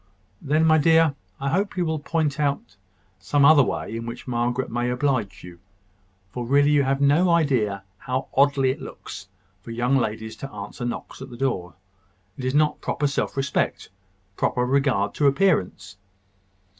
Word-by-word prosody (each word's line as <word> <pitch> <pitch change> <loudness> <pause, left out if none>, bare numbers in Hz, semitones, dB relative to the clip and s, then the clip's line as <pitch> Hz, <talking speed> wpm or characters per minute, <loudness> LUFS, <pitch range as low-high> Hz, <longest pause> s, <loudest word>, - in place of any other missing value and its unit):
"Then, 155 +3 +2
my 160 0 +5
dear, 160 0 +4 0.3
I 140 0 -1
hope 195 +6 -1
you 180 - +1
will 160 -1 -1
point 150 -1 -1
out 140 -8 -2 0.4
some 140 +10 +2
other 155 0 +7
way 115 -3 -2
in 115 0 -5
which 120 +2 -8
Margaret 120 +1 -1
may 120 +1 -1
oblige 125 -5 -1
you; 90 -1 -12 0.7
for 125 - -4
really 140 +4 +3
you 145 -1 +4
have 135 0 0
no 145 +6 +3
idea 125 -12 +1 0.2
how 130 +1 -3
oddly 135 -1 +3
it - - -7
looks 100 - -9 0.3
for - - -13
young 120 +4 +1
ladies 110 -2 -3
to 135 - -8
answer 105 +3 -7
knocks 120 - -6
at 135 - -8
the 120 - -10
door. 95 -9 -2 0.6
It 130 - -6
is 130 +2 -1
not 150 0 +2
proper 150 - -2
self 140 0 -1
respect, 135 0 -1 0.5
proper 125 0 0
regard 130 -7 +1
to 145 - +2
appearance. 135 - 0
135 Hz, 170 wpm, -24 LUFS, 120-145 Hz, 0.7 s, other